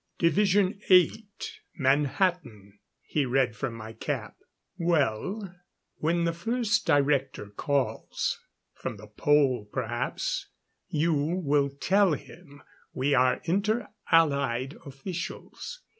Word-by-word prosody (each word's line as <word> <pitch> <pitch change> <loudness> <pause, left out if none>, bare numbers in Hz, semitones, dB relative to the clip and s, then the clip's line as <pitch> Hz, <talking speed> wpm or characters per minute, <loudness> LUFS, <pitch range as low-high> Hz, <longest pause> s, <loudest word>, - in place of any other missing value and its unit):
Division 195 +3 +3
8, 180 -4 +7 0.6
Manhattan," 135 - 0 0.2
he 150 - 0
read 130 -2 +1
from 120 +1 -3
my 110 0 -8
cap. 115 - -4 0.4
"Well, 170 - 0 0.4
when 170 +2 +1
the 170 0 +1
first 225 +4 0
Director 140 -7 +1
calls 140 +5 -1 0.3
from - - -5
the 105 - -11
Pole 130 0 +2
perhaps - - -2 0.4
you 160 +2 +1
will 145 -2 +1
tell 185 +6 +3
him 145 -2 -10 0.3
we 135 +2 +1
are 130 -1 +3
Inter 200 +7 0 0.2
Allied 140 -4 +3
Officials. 175 - -6
145 Hz, 100 wpm, -28 LUFS, 130-180 Hz, 0.6 s, 8